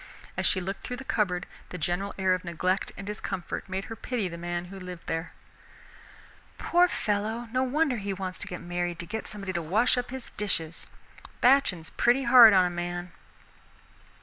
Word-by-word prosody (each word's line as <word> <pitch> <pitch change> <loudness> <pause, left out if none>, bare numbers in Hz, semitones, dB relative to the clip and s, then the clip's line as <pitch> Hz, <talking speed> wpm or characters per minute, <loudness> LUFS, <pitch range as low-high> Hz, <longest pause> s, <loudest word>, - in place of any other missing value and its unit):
As - - +1
she 185 - +3
looked 195 +2 -4
through 250 - -5
the 270 - -7
cupboard, 190 -8 0 0.2
the 180 - -6
general 180 +5 -2
air 190 -1 +3
of 185 - -2
neglect 180 +2 -1
and 195 - -7
discomfort 195 -2 -4
made 190 +1 -3
her 225 - -7
pity 230 -4 -2
the 170 - -6
man 175 +1 -3
who 195 +2 -9
lived 180 -2 -8
there. 165 +1 -3 1.3
"Poor 350 +1 +4
fellow, 220 -3 -1
no 255 +1 +1
wonder 265 0 +1
he 200 -1 -3
wants 185 -1 -4
to - - -3
get 175 - -5
married 175 0 -2
to 170 - -6
get 220 +5 -5
somebody 200 -3 -4
to 170 - -1
wash 215 +10 +2
up 245 - -4
his 260 -1 -7
dishes. 165 -5 -2 0.5
Batchin's 245 -11 +3
pretty 245 +3 +3
hard 235 -2 +9
on 185 -2 +5
a - - +1
man." 175 0 -4
195 Hz, 185 wpm, -28 LUFS, 175-230 Hz, 1.3 s, hard